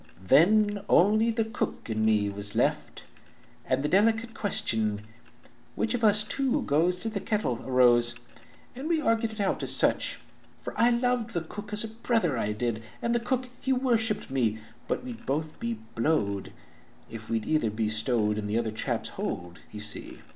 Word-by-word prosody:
"Then 205 Hz, -, +4 dB
only 215 Hz, +5 st, +4 dB
the 225 Hz, -1 st, 0 dB
cook 225 Hz, +2 st, -4 dB
and 110 Hz, -1 st, -1 dB
me 105 Hz, -2 st, +3 dB
was 100 Hz, 0 st, -2 dB
left, -, -, 0 dB, 0.6 s
And 130 Hz, +1 st, +1 dB
the -, -, +1 dB
delicate 225 Hz, +5 st, +2 dB
question, 110 Hz, -, 0 dB, 0.7 s
'Which 225 Hz, -, -1 dB
Of 245 Hz, -1 st, -2 dB
us 210 Hz, -1 st, +5 dB
two 270 Hz, +4 st, 0 dB
goes 175 Hz, +5 st, +1 dB
to 225 Hz, -, -1 dB
the 215 Hz, -2 st, -3 dB
kettle?' 195 Hz, -, -1 dB
arose 120 Hz, -2 st, +5 dB, 0.6 s
And 270 Hz, +4 st, -5 dB
we 330 Hz, -2 st, +2 dB
argued 230 Hz, -5 st, +1 dB
it 220 Hz, -, -10 dB
out 200 Hz, -, 0 dB
as -, -, +1 dB
sich. -, -, +1 dB, 0.5 s
"For -, -, -5 dB
I 235 Hz, +1 st, +4 dB
Ioved 240 Hz, -1 st, 0 dB
that 165 Hz, -2 st, -3 dB
cook 210 Hz, 0 st, -8 dB
as 210 Hz, +1 st, +1 dB
a -, -, -3 dB
brother, 220 Hz, -, 0 dB
I 105 Hz, -3 st, -1 dB
did, 110 Hz, +1 st, -2 dB, 0.2 s
And 235 Hz, -, 0 dB
the 240 Hz, -, +2 dB
cook 255 Hz, +1 st, -2 dB
he 265 Hz, -, -1 dB
worshipped 230 Hz, -, 0 dB
me; 115 Hz, -5 st, +1 dB, 0.3 s
But -, -, -2 dB
we'd 245 Hz, -2 st, -8 dB
both 155 Hz, +3 st, -2 dB
be 115 Hz, 0 st, -2 dB, 0.2 s
blowed 110 Hz, -7 st, 0 dB, 0.6 s
if 110 Hz, -1 st, -10 dB
we'd 115 Hz, -1 st, -1 dB
either 155 Hz, -8 st, +1 dB
be 110 Hz, +1 st, -1 dB
stowed 110 Hz, -1 st, 0 dB
In 105 Hz, -, -4 dB
the 105 Hz, +2 st, 0 dB
other 115 Hz, -2 st, -1 dB
chap's 110 Hz, -, -3 dB
hold, 90 Hz, 0 st, -5 dB
you 105 Hz, -, -7 dB
see. 105 Hz, 0 st, -3 dB
170 Hz, 180 wpm, -28 LUFS, -, 0.7 s, us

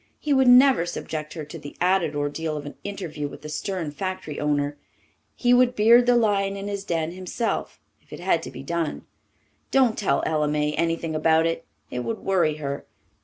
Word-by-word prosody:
He 295 Hz, -, 0 dB
would 265 Hz, -1 st, +4 dB
never 250 Hz, -7 st, +6 dB
subject 155 Hz, -3 st, -5 dB
her 155 Hz, -3 st, -6 dB
to 160 Hz, +3 st, -9 dB
the 145 Hz, -1 st, -10 dB
added 180 Hz, -4 st, +2 dB
ordeal 150 Hz, +2 st, -2 dB
of 145 Hz, -, -6 dB
an 145 Hz, -, -7 dB
interview 180 Hz, -7 st, -4 dB
with 145 Hz, -, -11 dB
the 150 Hz, -, -6 dB
stern 165 Hz, 0 st, -3 dB
factory 185 Hz, -2 st, -5 dB
owner. 145 Hz, -1 st, 0 dB, 0.6 s
He 245 Hz, 0 st, +3 dB
would 250 Hz, 0 st, +4 dB
beard 235 Hz, +3 st, +6 dB
the 245 Hz, -, +5 dB
lion 200 Hz, -4 st, +2 dB
in 200 Hz, +1 st, -5 dB
his 200 Hz, -1 st, -4 dB
den 165 Hz, -4 st, -1 dB
himself, 185 Hz, +6 st, -3 dB, 0.2 s
if -, -, -30 dB
it -, -, -8 dB
had 175 Hz, -2 st, +1 dB
to -, -, -7 dB
be -, -, -9 dB
done. 170 Hz, +1 st, -3 dB, 0.6 s
"Don't 255 Hz, -5 st, +3 dB
tell 205 Hz, -, +1 dB
Ella 155 Hz, -1 st, +1 dB
May 150 Hz, 0 st, 0 dB
anything 165 Hz, 0 st, -1 dB
about 160 Hz, +1 st, +3 dB
it. 165 Hz, 0 st, -2 dB, 0.3 s
It 125 Hz, -, -3 dB
would 220 Hz, -, -3 dB
worry 175 Hz, -7 st, +1 dB
her. 140 Hz, -2 st, -4 dB
170 Hz, 195 wpm, -24 LUFS, 150-200 Hz, 0.6 s, never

